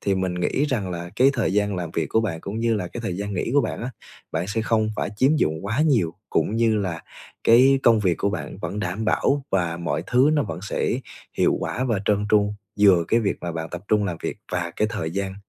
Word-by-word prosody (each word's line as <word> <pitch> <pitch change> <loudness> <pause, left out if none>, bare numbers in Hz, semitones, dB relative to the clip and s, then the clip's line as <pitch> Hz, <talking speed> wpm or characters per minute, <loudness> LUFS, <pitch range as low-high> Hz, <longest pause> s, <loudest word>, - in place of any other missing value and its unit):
Thì 100 - +1
mình 95 -1 -1
nghĩ 90 +10 0
rằng 110 -10 -2
là 85 0 -5
cái 130 +2 +5
thời 115 -8 0
gian 105 -1 +1
làm 90 -3 -4
việc 80 - -1
của 110 - +3
bạn 95 -8 -3
cũng 100 +5 -5
như 115 -1 +2
là 90 -4 -3
cái 120 - -7
thời 95 -6 -3
gian 100 0 -3
nghỉ 90 - -2
của 145 - +6
bạn 110 - -3
á, 125 - -3 0.4
bạn 85 +3 -1
sẽ 110 +2 -1
không 110 -1 +1
phải - - -2
chiếm 135 +8 +3
dụng 80 - 0
quá 115 +7 0
nhiều 120 - +2 0.2
cũng 110 - +1
như 115 -1 +3
là 90 -5 -3 0.4
cái 130 +4 +6
công 115 -2 +5
việc 90 -4 +2
của 100 - +1
bạn 100 - -5
vẫn 100 - -4
đảm 95 +3 -3
bảo 140 +5 +1
và 85 -3 0
mọi 85 -1 -2
thứ 130 +4 +4
nó 145 - +2
vẫn 85 -6 -5
sẽ 105 - -1 0.4
hiệu - - +3
quả 130 - -2
và 115 -6 0
trơn 105 0 +1
tru, 105 -1 +3 0.3
vừa 95 -5 +6
cái 115 - +3
việc 100 -3 0
mà 85 - -4
bạn 80 0 -4
tập 90 0 -6
trung 105 -1 +3
làm 90 -4 -2
việc - - -3 0.2
và 85 -1 -2
cái 105 - +1
thời 80 -7 -3
gian 95 +1 -3
100 Hz, 250 wpm, -23 LUFS, 90-115 Hz, 0.4 s, của